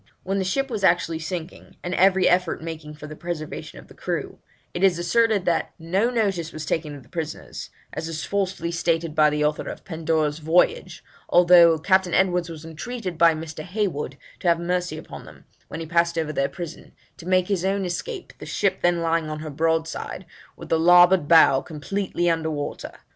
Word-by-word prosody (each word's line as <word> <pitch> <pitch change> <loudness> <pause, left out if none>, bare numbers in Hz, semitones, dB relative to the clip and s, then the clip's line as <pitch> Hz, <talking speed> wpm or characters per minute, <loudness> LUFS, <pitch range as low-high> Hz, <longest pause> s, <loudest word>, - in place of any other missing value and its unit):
When 195 +1 -1
the - - 0
ship 270 +8 -1
was 215 -4 -3
actually 170 -3 +2
sinking, 170 +1 -7
and 180 - -3
every 190 0 +4
effort 180 -1 +2
making 160 -2 -7
for 150 - -10
the 155 0 -8
preservation 170 -2 -6
of - - -13
the - - -15
crew, - - -4 0.3
it 175 - -3
is 190 -3 +4
asserted 210 +3 +2
that 170 - 0
'no 185 +8 0
notice 195 -9 -1
was 155 0 -6
taken 150 -2 -2
of 140 - -12
the - - -22
prisoners, 160 -2 -6 0.2
as 160 - -4
is 160 -1 -4
falsely 190 -4 -2
stated 165 -1 0
by 155 -1 +5
the 150 0 0
author 150 0 -1
of - - -6
the - - -26
Pandora's 160 -2 -1
Voyage, 180 - +1 0.3
although 175 -2 +7
Captain 185 +2 +2
Edwards 180 -2 +2
was 160 -1 -9
entreated 185 +4 -6
by 165 -1 +6
Mr. 155 0 -7
Heywood 180 -8 -3 0.2
to - - -3
have 170 -1 +4
mercy 175 -1 -2
upon - - -10
them, - - -15 0.2
when 165 - -6
he - - -5
passed 170 +1 +1
over 155 -2 -1
their 140 -1 0
prison, 170 +1 -8 0.2
to 175 -2 -11
make 185 -1 +2
his 195 -4 -1
own 195 0 0
escape, 380 - -5
the - - -9
ship 195 -2 0
then 175 -1 +2
lying 165 -1 0
on 155 0 -5
her 155 -1 -6
broadside, 160 +4 -2 0.3
with - - -10
the 165 - +2
larboard 175 -1 +6
bow 155 -5 +6
completely 175 +4 -3
under 165 -1 +1
water. 145 -2 -5
170 Hz, 195 wpm, -24 LUFS, 160-185 Hz, 0.3 s, although